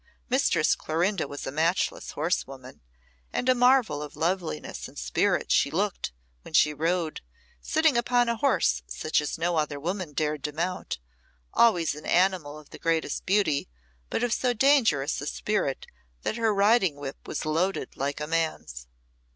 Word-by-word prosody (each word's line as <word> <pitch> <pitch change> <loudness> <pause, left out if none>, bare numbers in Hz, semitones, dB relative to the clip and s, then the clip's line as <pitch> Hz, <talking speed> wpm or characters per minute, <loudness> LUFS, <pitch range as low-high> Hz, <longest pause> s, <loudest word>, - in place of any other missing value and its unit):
Mistress - - +3
Clorinda 175 +4 -1
was 145 - -7
a 135 - -3
matchless 165 +5 0
horsewoman, 135 -5 -3 0.5
and 250 - -2
a 255 - +6
marvel 245 - +3
of 150 -1 -8
loveliness 165 - -2
and - - -16
spirit - - 0
she - - +4
looked - - -1 0.3
when - - -7
she 150 - +5
rode, 165 +1 -1 0.4
sitting 315 - +2
upon 245 0 +2
a 235 - +1
horse 65 - +2
such 155 - 0
as 150 - -4
no 170 +1 0
other 150 -2 -1
woman 175 0 -3
dared 150 -1 -1
to 150 - -2
mount 175 - -3 0.6
always 180 -10 +4
an 150 - -9
animal 175 -5 +2
of 155 -1 -15
the - - -10
greatest 165 -3 -1
beauty, 185 - +2 0.4
but - - -1
of 240 -1 +1
so 250 -1 +1
dangerous 225 - +3
a 145 - -5
spirit 200 -10 -1 0.4
that - - -1
her 225 -2 +1
riding 200 -4 +3
whip 140 -1 -8
was - - -4
loaded 165 -1 -1
like 140 +2 -2
a 150 - -2
man's. 155 - -2
165 Hz, 160 wpm, -27 LUFS, 145-205 Hz, 0.6 s, a